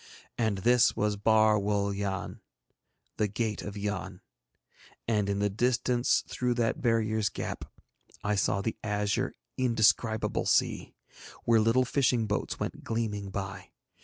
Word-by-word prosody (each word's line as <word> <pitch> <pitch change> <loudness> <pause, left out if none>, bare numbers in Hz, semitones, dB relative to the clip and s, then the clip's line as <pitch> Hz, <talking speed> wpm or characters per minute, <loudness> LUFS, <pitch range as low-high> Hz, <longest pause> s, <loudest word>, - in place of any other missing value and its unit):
And 110 -4 0
this 120 +5 +4
was 105 0 0
Bar 110 +1 +4
Wul 100 0 0
Yann, 100 -1 -4 0.8
the 105 - +2
gate 105 +1 -2
of 105 0 -7
Yann, 100 -2 -4 0.9
and 105 -3 +1
in 100 - 0
the 105 0 +1
distance 125 +2 +1
through 125 -1 -1
that 115 -2 0
barrier's 110 -3 +1
gap - - -5 0.6
I 105 - +1
saw 100 -1 +1
the 110 +2 -2
azure 105 +4 -1 0.2
indescribable 115 -2 +2
sea, - - +1 0.5
where 115 -1 +4
little 115 +4 +3
fishing 125 -3 +2
boats 105 -1 -2
went - - -4
gleaming 105 -3 -2
by. 95 0 -6
110 Hz, 135 wpm, -29 LUFS, 100-115 Hz, 0.9 s, this